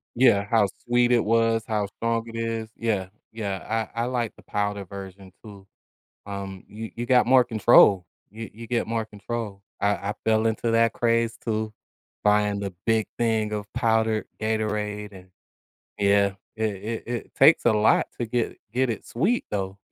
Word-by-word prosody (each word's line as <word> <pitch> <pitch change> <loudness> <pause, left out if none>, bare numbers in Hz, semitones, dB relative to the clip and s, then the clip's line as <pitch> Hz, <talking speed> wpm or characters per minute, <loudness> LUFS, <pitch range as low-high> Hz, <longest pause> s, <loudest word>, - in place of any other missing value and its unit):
Yeah, 115 -5 +4
how 110 -3 +4 0.2
sweet 120 0 +3
it 120 -2 +3
was, 115 0 +2
how 105 -2 0
strong 115 +2 -2
it 115 - -8
is, 115 -1 -3
yeah, 105 -5 -1 0.3
yeah. 110 +1 -3
I 115 - 0
I - - +1
like 120 -3 -2
the - - -17
powder 100 -1 -2
version 95 0 -10
too. 100 -3 -12 0.6
Um, 100 -2 -6
you 110 +1 -8
you 120 - -3
got 125 0 +5
more 130 0 +6
control. 110 -5 +5 0.2
You 110 +2 -8
you 115 +1 -10
get 120 -1 0
more 115 0 -2
control. 105 -1 -6 0.2
I 100 - +3 0.2
I - - -1
fell 110 0 +3
into 115 +1 0
that 115 0 +3
craze 115 -1 +1
too, 110 -1 -2 0.5
buying 105 -1 +3
the 100 -2 -4
big 110 -1 +2
thing 110 -2 +1
of 105 -1 -3
powdered 110 -1 +1
Gatorade 105 -1 -2
and 95 -1 -13 0.7
yeah. 100 0 +3 0.2
It 110 0 0 0.4
it - - -14
it 120 -1 -5
takes 155 +4 +6
a 120 - +5
lot 105 0 +3
to 120 - 0
get 115 0 -1 0.2
get 130 +2 +1
it 110 - -5
sweet 190 - 0
though. 95 -1 -3
110 Hz, 170 wpm, -25 LUFS, 100-115 Hz, 0.7 s, more